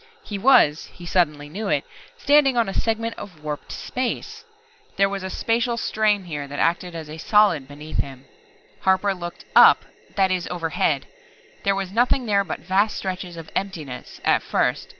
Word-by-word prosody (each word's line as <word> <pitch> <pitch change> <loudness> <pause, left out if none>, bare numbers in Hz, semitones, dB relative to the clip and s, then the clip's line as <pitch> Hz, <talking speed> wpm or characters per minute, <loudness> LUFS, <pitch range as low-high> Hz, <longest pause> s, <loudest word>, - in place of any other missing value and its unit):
He 205 -2 -5
was 230 - +5
he 175 - -13
suddenly 150 -5 +1
knew 200 +8 -5
it - - +1 0.3
standing 285 - +4
on 235 - +3
a 195 - -3
segment 225 +1 -1
of 170 -7 -11
warped 150 -1 -5
space! 430 - -4 0.5
There 195 - +4
was 195 0 -4
a 190 - -4
spacial 235 +4 0
strain 215 -3 +1
here 145 -5 -5
that 145 +1 -7
acted 175 +2 0
as 160 -2 -6
a 155 +1 -9
solid 200 -8 +3
beneath 150 +2 -8
him! 135 -1 -4 0.5
Harper 190 +1 +2
looked 175 -2 -8
"up" - - +7 0.3
that 190 -1 +3
is, 180 -1 -1
overhead. 165 -3 0 0.6
There 200 -3 +2
was 195 -1 -3
nothing 245 +4 +2
there 200 -2 +2
but 175 - -6
vast 195 +4 +1
stretches 185 -2 -5
of 165 -1 -9
emptiness 160 -10 -5
at - - +3
first. - - 0
190 Hz, 170 wpm, -23 LUFS, 160-215 Hz, 0.6 s, up